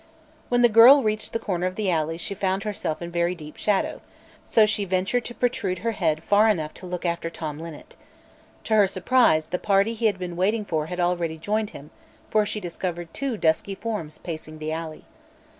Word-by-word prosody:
When 245 Hz, 0 st, +3 dB
the -, -, +8 dB
girl 240 Hz, +5 st, +8 dB
reached 215 Hz, 0 st, -2 dB
the -, -, 0 dB
corner 185 Hz, -5 st, -2 dB
of 185 Hz, -, -5 dB
the 205 Hz, -3 st, 0 dB
alley 160 Hz, 0 st, 0 dB
she 175 Hz, +4 st, -4 dB
found 190 Hz, 0 st, -1 dB
herself 200 Hz, -6 st, -3 dB
in 170 Hz, -, -6 dB
very 170 Hz, +1 st, 0 dB
deep 155 Hz, -3 st, -11 dB
shadow; 205 Hz, -2 st, 0 dB, 0.4 s
so 220 Hz, -, +4 dB
she 210 Hz, -1 st, -1 dB
ventured 190 Hz, +6 st, 0 dB
to 240 Hz, -, -7 dB
protrude 205 Hz, -7 st, -1 dB
her 230 Hz, -, +2 dB
head 165 Hz, -7 st, 0 dB
far 210 Hz, +4 st, +4 dB
enough 160 Hz, -7 st, -1 dB
to 185 Hz, -, -10 dB
look 180 Hz, 0 st, -5 dB
after 170 Hz, -1 st, -1 dB
Tom 155 Hz, -3 st, -6 dB
Linnet. 165 Hz, -2 st, -10 dB, 0.7 s
To 220 Hz, -, -2 dB
her 210 Hz, -2 st, +6 dB
surprise 185 Hz, -4 st, +3 dB
the 180 Hz, -, -3 dB
party 200 Hz, +3 st, +2 dB
he 225 Hz, 0 st, +1 dB
had 205 Hz, -3 st, 0 dB
been 180 Hz, -2 st, -5 dB
waiting 210 Hz, +4 st, +1 dB
for 155 Hz, -4 st, -1 dB
had 180 Hz, +1 st, -5 dB
already 175 Hz, -2 st, 0 dB
joined 210 Hz, +5 st, -1 dB
him, 145 Hz, +2 st, -12 dB, 0.4 s
for 215 Hz, -1 st, +3 dB
she 210 Hz, -, -3 dB
discovered 175 Hz, -2 st, -5 dB
two 270 Hz, -5 st, -3 dB
dusky 165 Hz, +3 st, +1 dB
forms 195 Hz, -8 st, -5 dB
pacing 155 Hz, -2 st, -7 dB
the 155 Hz, 0 st, -4 dB
alley. 160 Hz, -1 st, -6 dB
185 Hz, 205 wpm, -24 LUFS, 165-215 Hz, 0.7 s, the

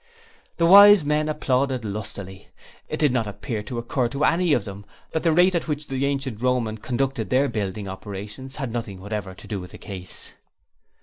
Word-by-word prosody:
The 170 Hz, -, +3 dB
Wise 200 Hz, -1 st, +9 dB
Men 150 Hz, +1 st, +1 dB
applauded 130 Hz, -4 st, 0 dB
lustily. 100 Hz, -2 st, -6 dB, 0.4 s
It -, -, -2 dB
did 150 Hz, -3 st, +3 dB
not 120 Hz, -4 st, 0 dB
appear 105 Hz, +2 st, -4 dB
to 110 Hz, +4 st, -6 dB
occur 120 Hz, +1 st, 0 dB
to 140 Hz, +4 st, -3 dB
any 175 Hz, 0 st, +2 dB
of 120 Hz, -8 st, +2 dB
them 100 Hz, 0 st, -8 dB, 0.3 s
that 160 Hz, -, -1 dB
the 165 Hz, -, +3 dB
rate 180 Hz, +3 st, +4 dB
at 170 Hz, -, -1 dB
which 150 Hz, -1 st, -2 dB
the 135 Hz, 0 st, -1 dB
ancient 135 Hz, -5 st, -3 dB
Roman 125 Hz, -4 st, 0 dB
conducted 130 Hz, -3 st, -2 dB
their 135 Hz, +5 st, +3 dB
building 100 Hz, -3 st, -3 dB
operations 105 Hz, +7 st, -7 dB
had 135 Hz, -5 st, -4 dB
nothing 110 Hz, -5 st, -4 dB
whatever 100 Hz, -1 st, -5 dB
to -, -, -13 dB
do 105 Hz, -3 st, -3 dB
with 90 Hz, -1 st, -9 dB
the -, -, -9 dB
case. 95 Hz, -2 st, -9 dB
125 Hz, 190 wpm, -24 LUFS, 105-145 Hz, 0.4 s, Wise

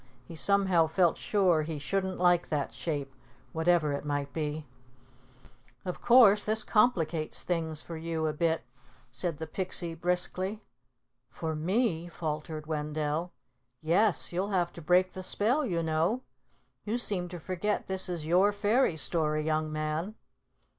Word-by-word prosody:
He 165 Hz, -, -10 dB
somehow 190 Hz, -2 st, +3 dB
felt 170 Hz, +1 st, +2 dB
sure 185 Hz, -6 st, +2 dB
he 155 Hz, 0 st, -4 dB
shouldn't 190 Hz, +5 st, -2 dB
like 175 Hz, -1 st, +3 dB
that 145 Hz, -2 st, -2 dB
shape, 145 Hz, -4 st, -4 dB, 0.4 s
whatever 160 Hz, -2 st, +2 dB
it 140 Hz, -, -3 dB
might 145 Hz, -1 st, -3 dB
be. 155 Hz, -1 st, -3 dB, 1.2 s
"Of 180 Hz, -, -5 dB
course, 230 Hz, -4 st, +6 dB
this 220 Hz, +1 st, 0 dB
complicates 170 Hz, -9 st, +1 dB
things 160 Hz, -3 st, -2 dB
for 170 Hz, -, -7 dB
you 160 Hz, 0 st, -3 dB
a 155 Hz, -, 0 dB
bit," 160 Hz, -1 st, 0 dB, 0.5 s
said 155 Hz, +6 st, -3 dB
the 160 Hz, -, -5 dB
Pixie 175 Hz, 0 st, -2 dB
briskly. 180 Hz, +4 st, 0 dB, 0.7 s
"For 160 Hz, +6 st, -4 dB
me?" 175 Hz, +1 st, 0 dB
faltered 155 Hz, -2 st, -5 dB
Wendell. 150 Hz, +2 st, -2 dB, 0.5 s
"Yes, 180 Hz, +5 st, +2 dB
you'll 190 Hz, +3 st, -1 dB
have 175 Hz, -3 st, 0 dB
to 170 Hz, -, -9 dB
break 180 Hz, +3 st, +3 dB
the 185 Hz, -, -6 dB
spell, 230 Hz, +10 st, +1 dB
you 175 Hz, -10 st, -1 dB
know. 165 Hz, +10 st, 0 dB, 0.6 s
You 220 Hz, +3 st, -1 dB
seem 195 Hz, -7 st, -1 dB
to 175 Hz, 0 st, -7 dB
forget 185 Hz, +5 st, -2 dB
this 190 Hz, 0 st, 0 dB
is 170 Hz, -4 st, -4 dB
your 185 Hz, +5 st, +4 dB
fairy 205 Hz, -2 st, +2 dB
story, 155 Hz, -2 st, 0 dB
young 155 Hz, 0 st, 0 dB
man." 155 Hz, +6 st, -3 dB
170 Hz, 145 wpm, -29 LUFS, 155-190 Hz, 1.2 s, course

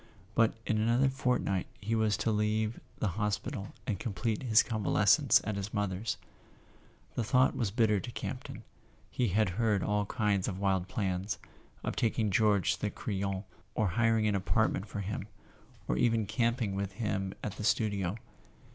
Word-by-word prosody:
But 115 Hz, 0 st, +3 dB
in 110 Hz, -, +1 dB
another 120 Hz, +5 st, +3 dB
fortnight 125 Hz, -8 st, 0 dB
he 110 Hz, +2 st, -3 dB
was 110 Hz, -2 st, +2 dB
to 115 Hz, -, 0 dB
leave 105 Hz, +1 st, 0 dB, 0.2 s
the 105 Hz, -, 0 dB
hospital 105 Hz, -1 st, -2 dB
and 100 Hz, -5 st, -2 dB
complete 105 Hz, +1 st, -2 dB
his 115 Hz, -3 st, +5 dB
convalescence 110 Hz, -4 st, +4 dB
at 105 Hz, -2 st, -2 dB
his 100 Hz, +3 st, -4 dB
mother's. 105 Hz, +1 st, -1 dB, 1.0 s
The 120 Hz, -, -1 dB
thought 125 Hz, +4 st, +3 dB
was 115 Hz, -5 st, 0 dB
bitter 105 Hz, -1 st, +2 dB
to 120 Hz, -, -6 dB
Campton; -, -, -6 dB, 0.5 s
he 125 Hz, -, +1 dB
had 105 Hz, +1 st, +2 dB
had 105 Hz, +1 st, +1 dB
all 105 Hz, -1 st, 0 dB
kinds 105 Hz, -5 st, +1 dB
of 95 Hz, -, -3 dB
wild 95 Hz, -2 st, +1 dB
plans—of 95 Hz, -4 st, -4 dB
taking 110 Hz, -2 st, +1 dB
George 105 Hz, -2 st, +3 dB
to -, -, -8 dB
the -, -, 0 dB
Crillon, 100 Hz, -1 st, -3 dB, 0.3 s
or 105 Hz, -3 st, +2 dB
hiring 115 Hz, +2 st, +2 dB
an 105 Hz, -, +2 dB
apartment 100 Hz, +1 st, +1 dB
for 100 Hz, -, -4 dB
him, 100 Hz, +1 st, -4 dB, 0.6 s
or -, -, 0 dB
even 115 Hz, -2 st, +3 dB
camping 115 Hz, 0 st, 0 dB
with 100 Hz, 0 st, -3 dB
him 100 Hz, -3 st, -2 dB
at 105 Hz, -, -4 dB
the -, -, -5 dB
studio. 100 Hz, -4 st, +1 dB
105 Hz, 160 wpm, -31 LUFS, 100-115 Hz, 1.0 s, his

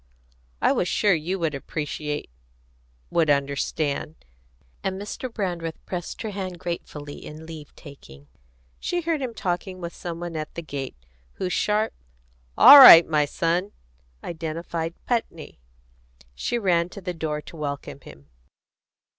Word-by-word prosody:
"I -, -, +5 dB
was 180 Hz, -, 0 dB
sure 205 Hz, +2 st, +3 dB
you 170 Hz, +4 st, -2 dB
would 165 Hz, -4 st, -1 dB
appreciate 150 Hz, -, -4 dB, 0.8 s
would 160 Hz, -3 st, +2 dB
understand;" 140 Hz, +2 st, -1 dB, 0.7 s
and 190 Hz, 0 st, -2 dB
Mr. 210 Hz, +5 st, -6 dB
Brandreth 175 Hz, -7 st, -3 dB
pressed 180 Hz, +3 st, -5 dB
her 220 Hz, -, -4 dB
hand 190 Hz, -3 st, -5 dB
gratefully 150 Hz, -4 st, -6 dB
in 155 Hz, +1 st, -10 dB
leave 155 Hz, -3 st, -10 dB
taking. 75 Hz, -, -14 dB, 0.5 s
She 355 Hz, -, -2 dB
heard 325 Hz, -3 st, -1 dB
him 245 Hz, -3 st, -4 dB
talking 185 Hz, 0 st, -3 dB
with 170 Hz, -1 st, -6 dB
some 170 Hz, -1 st, -6 dB
one 175 Hz, -1 st, -6 dB
at 155 Hz, -1 st, -5 dB
the 170 Hz, -, -5 dB
gate, 140 Hz, -3 st, -6 dB, 0.4 s
whose 180 Hz, -, -3 dB
sharp, 215 Hz, +1 st, +1 dB, 0.6 s
"All 285 Hz, -, +11 dB
right, 170 Hz, -11 st, +12 dB
my 150 Hz, -2 st, +2 dB
son!" 170 Hz, +6 st, -1 dB, 0.5 s
identified 165 Hz, 0 st, -4 dB
Putney. 165 Hz, -, -3 dB, 0.7 s
She 65 Hz, -, -2 dB
ran 175 Hz, -5 st, +1 dB
to 200 Hz, -, -10 dB
the 180 Hz, -1 st, -4 dB
door 155 Hz, -2 st, -3 dB
to 150 Hz, -, -12 dB
welcome 140 Hz, -2 st, -5 dB
him. 70 Hz, -, -14 dB
170 Hz, 140 wpm, -24 LUFS, 150-185 Hz, 0.8 s, right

